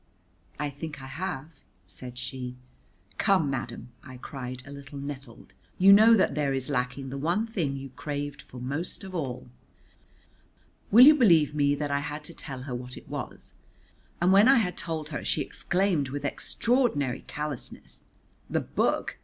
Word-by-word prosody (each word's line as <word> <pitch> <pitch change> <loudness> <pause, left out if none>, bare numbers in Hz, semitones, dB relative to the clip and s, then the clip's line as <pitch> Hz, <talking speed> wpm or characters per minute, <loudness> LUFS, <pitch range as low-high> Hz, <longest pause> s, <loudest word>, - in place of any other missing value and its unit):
"I 150 -1 -2
think 150 +1 -7
I 135 - -9
have," 160 +1 -5 0.3
said 125 -1 -9
she. 125 0 -5 0.6
"Come, 185 -9 +3
madam," 135 - -5
I 130 -1 -10
cried 125 -1 -7
a 140 - -10
little 140 0 -9
nettled, 140 -3 -8 0.2
"you 195 +2 +8
know 220 +3 +8
that 190 - +2
there 140 -2 0
is 135 +2 -2
lacking 125 +1 -2
the 135 +1 -5
one 175 +9 +1
thing 175 -12 -2
you 135 0 -7
craved 145 +2 -5
for 125 - -11
most 145 +11 -3
of 190 -1 -8
all." 130 -8 -4 1.4
Will 235 +5 +9
you 305 - +10
believe 170 - +5
me 145 -1 +2
that 145 0 -3
I 140 - +2
had 150 +1 -5
to 170 - -8
tell 135 -5 -7
her 135 -2 -5
what 125 +1 -6
it - - -13
was? - - -6 0.7
And 180 +2 +4
when 200 +4 +7
I 270 +1 +7
had 180 -6 +1
told 160 -3 -4
her 145 - -4
she - - 0
exclaimed 175 -7 +1
with 145 +1 -4
extraordinary 150 - +1
callousness, 150 -4 -6 0.5
"The - - 0
book? - - -1
145 Hz, 170 wpm, -28 LUFS, 135-175 Hz, 1.4 s, you